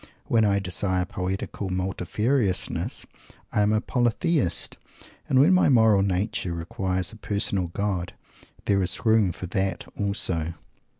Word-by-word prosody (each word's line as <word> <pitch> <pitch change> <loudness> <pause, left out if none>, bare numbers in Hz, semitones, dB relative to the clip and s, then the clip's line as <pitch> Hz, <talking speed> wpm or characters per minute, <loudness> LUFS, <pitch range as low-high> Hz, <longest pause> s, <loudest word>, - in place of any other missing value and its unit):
When 115 -1 +3
I 100 -1 +3
desire 90 -1 0
poetical 95 +2 -4
multifariousness, 95 +4 0 0.5
I 105 - +2
am 105 +1 +3
a 110 - +3
Polytheist. 120 - 0 0.5
And 130 - +4
when 155 +8 +6
my 185 - +4
moral 110 -6 +5
nature 95 -1 -1
requires 90 +2 -2
a - - -11
Personal 100 -3 -1
God 90 0 -2 0.5
_there 100 -1 +2
is 95 +5 -1
room 110 -4 +4
for 90 - -7
That 95 0 -2
also?" 95 -5 -1
100 Hz, 130 wpm, -25 LUFS, 90-110 Hz, 0.5 s, when